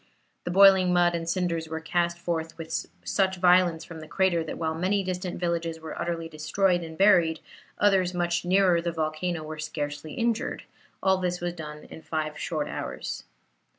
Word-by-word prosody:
The -, -, -2 dB
boiling 190 Hz, 0 st, +6 dB
mud 175 Hz, -1 st, +4 dB
and 165 Hz, -1 st, -3 dB
cinders 170 Hz, -3 st, -1 dB
were 160 Hz, 0 st, -3 dB
cast 170 Hz, +1 st, 0 dB
forth 165 Hz, -2 st, -3 dB
with 165 Hz, -1 st, -4 dB, 0.2 s
such 190 Hz, -1 st, +1 dB
violence 175 Hz, -2 st, +4 dB
from 165 Hz, -1 st, -9 dB
the 155 Hz, -, -10 dB
crater, 175 Hz, 0 st, +1 dB
that 160 Hz, -, -6 dB
while 160 Hz, -1 st, -1 dB
many 190 Hz, +5 st, 0 dB
distant 185 Hz, -1 st, -4 dB
villages 170 Hz, -2 st, -1 dB
were 160 Hz, -1 st, -7 dB
utterly 170 Hz, -1 st, -2 dB
destroyed 170 Hz, +4 st, +1 dB
and 160 Hz, -1 st, -8 dB
buried, 175 Hz, -5 st, +4 dB, 0.4 s
others 190 Hz, -3 st, +3 dB
much 175 Hz, -1 st, 0 dB
nearer 180 Hz, -1 st, +3 dB
the 170 Hz, 0 st, -2 dB
volcano 160 Hz, +1 st, -2 dB
were 155 Hz, 0 st, -7 dB
scarcely 150 Hz, -1 st, -4 dB
injured; 235 Hz, +1 st, -1 dB
and -, -, -29 dB, 0.3 s
all 190 Hz, 0 st, +4 dB
this 180 Hz, -1 st, -1 dB
was 175 Hz, 0 st, -3 dB
done 150 Hz, -3 st, -8 dB
in -, -, -11 dB
five 155 Hz, -1 st, -3 dB
short 155 Hz, -4 st, -2 dB
hours. -, -, -5 dB
170 Hz, 180 wpm, -27 LUFS, 160-180 Hz, 0.4 s, boiling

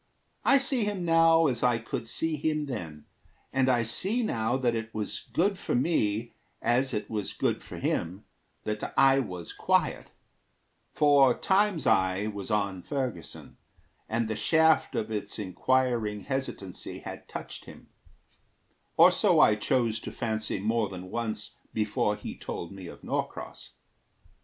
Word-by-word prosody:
I 275 Hz, -, +6 dB
see 265 Hz, -3 st, +1 dB
him 205 Hz, -4 st, -2 dB
now 165 Hz, 0 st, +5 dB
as 125 Hz, -6 st, +1 dB
I 120 Hz, -2 st, +3 dB
could 115 Hz, 0 st, -5 dB
see 160 Hz, +7 st, 0 dB
him 155 Hz, 0 st, -1 dB
then, 80 Hz, -, -6 dB, 0.5 s
And 130 Hz, 0 st, +3 dB
I 120 Hz, -2 st, +3 dB
see 190 Hz, -, +1 dB
now 120 Hz, -, 0 dB
that 125 Hz, -3 st, +1 dB
it 115 Hz, 0 st, -4 dB
was 105 Hz, -1 st, -4 dB
good 195 Hz, +2 st, +1 dB
for -, -, -2 dB
me, 120 Hz, -6 st, 0 dB, 0.3 s
As 125 Hz, +3 st, +1 dB
it 105 Hz, -, -3 dB
was 105 Hz, -3 st, -3 dB
good -, -, -1 dB
for -, -, -9 dB
him, 90 Hz, +4 st, -2 dB, 0.4 s
that 105 Hz, 0 st, -4 dB
I 135 Hz, 0 st, +6 dB
was 90 Hz, -9 st, -5 dB
quiet; -, -, +1 dB, 0.8 s
For 140 Hz, -4 st, +5 dB
Time's 195 Hz, -3 st, +2 dB
eye 95 Hz, +2 st, +2 dB
was 100 Hz, -2 st, -5 dB
on 100 Hz, -4 st, 0 dB
Ferguson, 125 Hz, -, -5 dB, 0.5 s
and 115 Hz, 0 st, 0 dB
the 110 Hz, -, -2 dB
shaft 160 Hz, +3 st, +3 dB
Of 110 Hz, 0 st, -2 dB
its 105 Hz, -1 st, -3 dB
inquiring 110 Hz, +1 st, 0 dB
hesitancy 130 Hz, -9 st, -5 dB
had -, -, -8 dB
touched -, -, -7 dB
him, -, -, -14 dB, 1.1 s
Or -, -, +8 dB
so -, -, +3 dB
I -, -, +7 dB
chose 115 Hz, +1 st, 0 dB
to -, -, -7 dB
fancy 110 Hz, -3 st, -2 dB
more 110 Hz, +1 st, 0 dB
than 90 Hz, -1 st, -8 dB
once 110 Hz, -3 st, -4 dB, 0.2 s
Before 105 Hz, -1 st, 0 dB
he -, -, -7 dB
told 85 Hz, +3 st, -6 dB
of 90 Hz, -2 st, -10 dB
Norcross. -, -, -5 dB
115 Hz, 145 wpm, -28 LUFS, 105-140 Hz, 1.1 s, Or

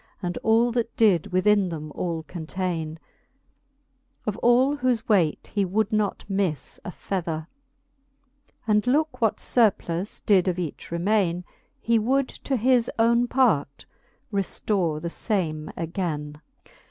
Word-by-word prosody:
And 175 Hz, -2 st, -3 dB
all 230 Hz, +2 st, +3 dB
that 235 Hz, -1 st, -2 dB
did 200 Hz, -8 st, +4 dB
within 195 Hz, +1 st, +3 dB
them 155 Hz, -2 st, -6 dB
all 165 Hz, -2 st, -3 dB
containe; 165 Hz, 0 st, -4 dB, 1.3 s
Of 215 Hz, -, -1 dB
all 255 Hz, +4 st, +4 dB
whofe 250 Hz, -4 st, 0 dB
weight 180 Hz, -8 st, +1 dB
he 205 Hz, -, +2 dB
would 205 Hz, +4 st, 0 dB
not 210 Hz, -2 st, 0 dB
miffe 195 Hz, -6 st, -2 dB
a -, -, -6 dB
fether. 165 Hz, -4 st, -4 dB, 1.2 s
And 210 Hz, +1 st, +2 dB
looke 300 Hz, +2 st, +1 dB
what 225 Hz, -2 st, +2 dB
furplus 200 Hz, -5 st, 0 dB
did 195 Hz, -3 st, +4 dB
of 180 Hz, -1 st, 0 dB
each 170 Hz, -5 st, -5 dB
remaine. 180 Hz, 0 st, +1 dB, 0.4 s
He 230 Hz, -1 st, +2 dB
would 260 Hz, +4 st, +1 dB
to 270 Hz, -, -3 dB
his 245 Hz, +1 st, +3 dB
owne 235 Hz, +1 st, +3 dB
part 215 Hz, -, +1 dB, 0.5 s
reftore 190 Hz, -4 st, 0 dB
the 170 Hz, +1 st, -4 dB
fame 160 Hz, -9 st, -2 dB
againe. 160 Hz, -4 st, -3 dB
195 Hz, 130 wpm, -25 LUFS, 170-230 Hz, 1.3 s, did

